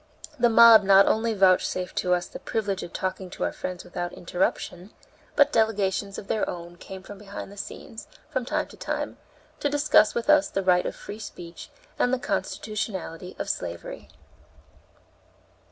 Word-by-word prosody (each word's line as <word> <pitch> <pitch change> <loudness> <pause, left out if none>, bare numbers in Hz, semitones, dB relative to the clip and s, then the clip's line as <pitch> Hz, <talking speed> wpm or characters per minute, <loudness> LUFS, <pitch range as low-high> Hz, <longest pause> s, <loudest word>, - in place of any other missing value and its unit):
The 240 0 +5
mob 230 -1 +9
not 195 0 +6
only 225 0 +1
vouchsafed 185 -1 +2
to 180 0 +2
us 175 0 -3
the - - -9
privilege 200 -4 -2
of 170 - -7
talking 190 0 -3
to - - -5
our - - 0
friends 180 -1 -6
without 175 0 -5
interruption, 180 +1 -2 0.5
but 285 - +5
delegations 200 -3 +1
of 195 - -8
their 215 - 0
own 175 0 -7
came 190 +1 -10
behind 200 0 -9
the - - -12
scenes, 220 +3 -8 0.2
from 270 -5 -2
time 305 +5 -1
to - - -13
time, - - -3 0.4
to 290 - 0
discuss 290 -6 +4
with 235 +2 -2
us 300 -1 +5
the 195 - -2
right 180 -1 +3
of - - -5
free 210 - -9
speech 175 -5 -9 0.3
and 245 - +3
the 260 - +2
constitutionality 200 -7 -4
of - - -4
slavery. - - -5
200 Hz, 165 wpm, -26 LUFS, 185-225 Hz, 0.5 s, mob